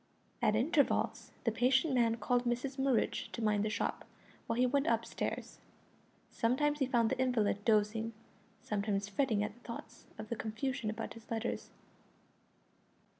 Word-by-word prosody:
At 210 - +3
intervals 285 +6 +1
the 230 - +2
patient 260 +6 +3
man 230 -2 +3
called 245 +1 +1
Mrs 255 +3 -1
Murridge 265 -4 +1
to - - -4
mind 210 -1 +2
the 215 - 0
shop, - - -2 0.4
while 230 - -1
he 250 - +4
went 280 +4 +1
up - - +2
stairs. - - -4 0.7
Sometimes 290 +6 +1
he 270 - +2
found 235 -2 +2
the 260 - -1
invalid 220 -6 +1
dozing, 220 +1 +2 0.5
sometimes 205 -1 -1
fretting 210 -1 +1
at 210 0 -3
the 240 - -21
thoughts 235 -1 -9
of 215 0 -7
the 235 - -1
confusion 230 +2 -2
about 220 +1 -4
his 230 0 -14
letters. 230 0 -2
230 Hz, 155 wpm, -34 LUFS, 215-260 Hz, 0.7 s, he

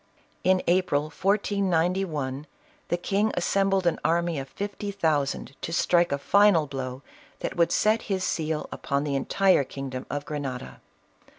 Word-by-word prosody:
In 185 0 +3
April, 170 -4 +1
1491, 180 -8 0 0.4
the 175 - 0
king 200 +4 0
assembled 195 +1 +1
an 170 - +1
army 170 -1 +1
of 135 0 -7
fifty 205 +3 -5
thousand, 155 -8 -1
to - - -4
strike 175 +1 +3
a 140 - +1
final 200 +1 +4
blow 130 -1 -5 0.4
that - - -3
would 170 -1 +3
set 220 +1 +3
his 190 -2 0
seal 160 -3 -1
upon 140 0 -2
the 145 -2 -1
entire 185 +3 +3
kingdom 130 -1 -6
of 145 0 -3
Grenada. 135 -4 -5
170 Hz, 140 wpm, -26 LUFS, 140-195 Hz, 0.4 s, final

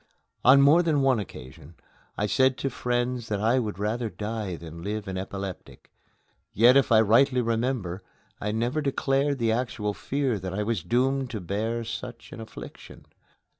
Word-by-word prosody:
On 135 +3 +7
more 150 +5 +6
than 155 -5 +1
one 130 -4 +3
occasion 75 -3 -10 0.4
I 105 - 0
said 130 +4 +2
to 135 - -2
friends 120 0 -2
that 105 -2 -2
I 115 +5 +2
would 105 -6 -3
rather 110 +3 -2
die 105 -3 -4
than 85 0 -10
live 105 +2 -4
an 95 - -4
epileptic; 95 0 -7 0.6
yet, 120 +5 +6
if 135 -4 +3
I 110 -1 +7
rightly 125 +5 +4
remember, 115 -5 -1 0.4
I 105 - -1
never 120 +7 -1
declared 140 0 0
the 115 -3 +1
actual 110 -3 -2
fear 135 -2 -1
that 95 0 -5
I 105 - -1
was 110 -3 -1
doomed 130 +5 0
to 110 - -4
bear 110 +6 -2
such 115 - -7
an - - -8
affliction. 110 - -11
115 Hz, 170 wpm, -26 LUFS, 105-130 Hz, 0.6 s, On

